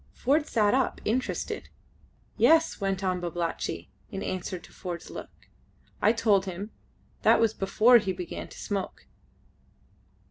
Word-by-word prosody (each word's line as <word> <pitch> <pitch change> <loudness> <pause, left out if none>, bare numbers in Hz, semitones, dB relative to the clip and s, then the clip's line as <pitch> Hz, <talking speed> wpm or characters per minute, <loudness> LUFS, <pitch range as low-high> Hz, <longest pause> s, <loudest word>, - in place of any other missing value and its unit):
Ford 295 +4 +1
sat 210 -3 +2
up 260 -1 +1
interested. 245 +4 -2 0.7
"Yes," 320 +4 +4
went 195 0 -1
on 185 -1 0
Babalatchi, 170 -1 -3 0.2
in 195 -2 -5
answer 185 0 -3
to 170 - -15
Ford's 175 -2 -6
look. - - -7 0.7
"I 210 - +5
told 210 -4 +2
him. 190 +4 -5 0.5
That - - +5
was 225 -2 +3
before 220 +5 +5
he 195 -3 -2
began 180 -2 -6
to - - -13
smoke." 200 -2 -4
200 Hz, 135 wpm, -28 LUFS, 185-230 Hz, 0.7 s, I